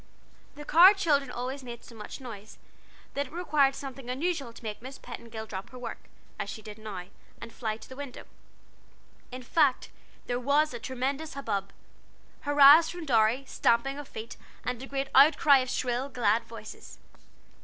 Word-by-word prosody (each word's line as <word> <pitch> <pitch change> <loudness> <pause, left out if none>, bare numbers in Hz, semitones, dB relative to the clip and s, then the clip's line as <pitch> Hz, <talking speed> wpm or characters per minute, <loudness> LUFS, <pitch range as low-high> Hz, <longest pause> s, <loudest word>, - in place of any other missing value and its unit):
The 295 +1 -9
Carr 360 +7 +8
children 290 -8 +1
always 255 +3 -4
made 235 -1 -9
so - - -14
much 215 +3 -9
noise, 220 -5 -10 0.6
that 280 0 -2
it - - -18
required 300 -5 +2
something 270 -3 -8
unusual 280 -1 -2
to 230 - -15
make 215 -1 -5
Miss 260 +2 -9
Petingill 230 -2 -8
drop 195 -3 -7
her 255 - -11
work, 250 - -7 0.3
as - - -3
she 220 - -7
did 210 0 -10
now, 200 -5 -7 0.3
and 230 - -9
fly 220 -3 -3
to - - -13
the 260 - -10
window. 280 -2 -8 1.1
In 255 0 -7
fact 280 0 +2 0.3
there 245 0 -2
was 285 +3 +2
a 240 - -5
tremendous 270 +5 -3
hubbub: 200 -8 -3 0.7
hurrahs 290 +3 +8
from 350 -1 -6
Dorry, 235 0 +3
stamping 270 +2 +1
of 290 - -8
feet, 220 +2 -8 0.3
and 250 -1 -3
a 265 - -7
great 275 0 -3
outcry 285 0 +7
of 255 -1 -3
shrill, 250 +2 -1
glad 230 -3 +1
voices. 220 -2 -11
255 Hz, 170 wpm, -28 LUFS, 230-280 Hz, 1.1 s, Carr